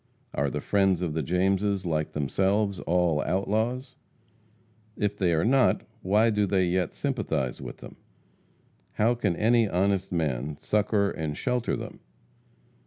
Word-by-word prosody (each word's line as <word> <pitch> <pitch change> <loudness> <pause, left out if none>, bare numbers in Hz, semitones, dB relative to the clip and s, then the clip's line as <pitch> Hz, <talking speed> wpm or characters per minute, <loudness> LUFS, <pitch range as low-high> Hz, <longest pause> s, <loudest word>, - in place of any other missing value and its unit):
Are 70 +1 0
the - - -4
friends 95 -3 +2
of 80 -4 -2
the 80 - -1
Jameses, 95 +4 0
like 80 -2 -1
themselves, 95 +7 0
all 85 -3 +1
outlaws? 110 +7 -1 1.0
If 105 -1 0
they 95 -4 +1
are 80 +2 +1
not, 130 +2 +3 0.2
why 105 +4 +3
do 105 -1 +1
they 95 -1 +2
yet 90 -1 -1
sympathize 95 - -2
with - - -7
them? - - -11 1.0
How 115 +3 +2
can 105 -7 -1
any 115 +1 +3
honest 95 +1 0
man 75 -4 -2
succor 105 +2 +1
and 75 -2 -4
shelter 125 -2 -1
them? - - -8
95 Hz, 140 wpm, -27 LUFS, 85-105 Hz, 1.0 s, not